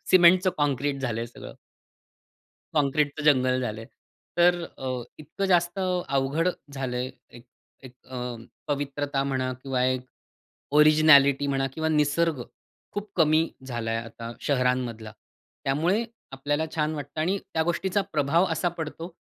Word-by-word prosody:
सिमेंटच 185 +1 +6
concrete 145 -1 0
झालं 120 -4 -2
आहे 115 - -3
सगळं. 120 - -11 1.2
काँक्रीटचं 145 0 +1
जंगल 130 -3 +4
झालं 110 -3 -3
आहे. 115 - -11 0.5
तर 175 0 +4 0.2
अ, 130 -2 -3 0.2
इतकं 155 +6 -5
जास्त 175 0 +2 0.3
अवघड 140 +5 +1 0.2
झालं 135 -3 -3
आहे 125 +1 -2 0.3
एक 120 - -14 0.4
एक 130 - -11
अ, 130 - -8 0.5
पवित्रता 140 -1 -1
म्हणा 130 -2 -1
किंवा 130 -2 0
एक 130 0 0 0.7
ओरिजिनॅलिटी 145 -2 +6
म्हणा 135 -1 0
किंवा 160 0 -1
निसर्ग. 150 -1 +1 0.5
खूप 205 +1 -5
कमी 155 -2 +4 0.3
झाला 120 -2 -3
आहे 115 - 0
आता 115 +1 -8
शहरांमधला. 125 -5 0 0.5
त्यामुळे 165 +11 +1 0.3
आपल्याला 145 +3 -1
छान 155 -1 0
वाटतं 145 +1 -6
आणि 185 +5 +1 0.2
त्या 160 - +2
गोष्टीचा 185 +4 0
प्रभाव 155 +5 +3
असा 180 - 0
पडतो, 165 +1 -5
145 Hz, 135 wpm, -26 LUFS, 130-160 Hz, 1.2 s, सिमेंटच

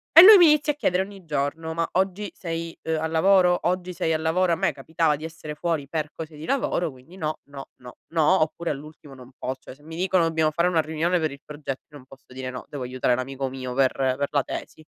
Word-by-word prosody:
E 330 - +13
lui 415 +3 +11
mi 350 - +8
inizia 300 0 +2
a - - -20
chiedere 185 -10 +1
ogni 195 -1 -8
giorno: 155 +2 -2
“Ma 165 0 -1
oggi 190 +2 0
sei, 165 -1 -5
uhm, 160 0 -1
al 160 - -1
lavoro? 180 +2 +4
Oggi 180 +1 -1
sei 165 -2 0
al 155 - -1
lavoro?” 175 +3 +2
A - - +3
me - - +1
capitava 160 -2 0
di 150 - -10
essere 160 -2 -7
fuori 160 -3 -2
per 155 0 -3
cose 160 -1 -8
di 150 +1 -8
lavoro, 175 - 0
quindi 130 +7 -16
no, 155 -3 -3
no, 140 -1 -10
no, 125 -1 -13
no, 165 +3 +3
oppure 165 +2 -4
all'ultimo 150 -1 -8
non 130 0 -14
pos 130 +1 -4
cioè - - -10
se 135 - -21
mi 160 +2 -10
dicono: 185 0 +2
"Dobbiamo 160 -1 +1
fare 170 +3 +2
una 170 -3 +3
riunione 160 +3 0
per 155 -2 -1
il 140 0 -11
progetto", 145 -3 -6
io 150 - -12
non 130 - -15
posso 135 +1 -17
dire: 130 0 -5
“No, 125 - -7
devo 140 -3 -5
aiutare 125 0 0
l'amico 135 +1 -3
mio 130 -1 -6
per 130 0 +3
per 135 +1 0
la 145 -2 +1
tesi.” 155 - -7
160 Hz, 245 wpm, -25 LUFS, 140-175 Hz, -, E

